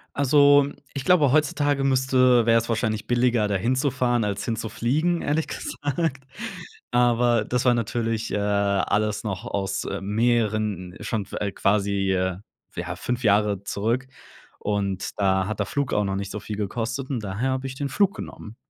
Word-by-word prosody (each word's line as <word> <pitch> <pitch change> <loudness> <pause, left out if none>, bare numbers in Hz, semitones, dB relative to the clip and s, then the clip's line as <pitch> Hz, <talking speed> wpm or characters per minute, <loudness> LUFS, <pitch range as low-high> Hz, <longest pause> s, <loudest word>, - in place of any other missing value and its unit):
Also, 145 0 +5 0.3
ich 140 -2 -5
glaube, 155 -8 +4
heutzutage 145 -2 +2
müsste 130 -2 +4
wäre 115 0 +5
es 115 - -5
wahrscheinlich 110 -2 -1
billiger, 120 -3 +2
da 100 - -1
hinzufahren, 125 +1 +1
als 100 -1 -2
hinzufliegen, 125 +9 -1
ehrlich 155 +2 0
gesagt. 145 -1 -3 0.7
Aber, 120 -2 +3
das 125 +2 -1
war 125 - +5
natürlich, 115 -1 -2
äh, - - +1
alles 100 +1 +1
noch 95 -4 -4
aus 95 -1 -2 0.2
mehreren 105 -4 0
schon 110 -3 -2
f - - -18
äh, 100 -1 -1
quasi, 100 0 +1 0.8
ja, - - -4
5 125 0 -3
Jahre 105 -1 +2
zurück 115 +7 -1 0.5
und 100 -2 -2
da 95 -1 +2
hat 110 - -4
der - - +1
Flug 140 -2 -2
auch 105 - +2
noch 95 0 -1
nicht 100 0 -4
so 105 - -4
viel 105 0 -6
gekostet 120 +6 -3
und 120 -6 -2
daher 105 +7 -2
habe 130 +1 -2
ich 130 - -7
den 140 +1 -3
Flug 200 +7 +2
genommen. 110 +2 -9
115 Hz, 160 wpm, -24 LUFS, 105-130 Hz, 0.8 s, Also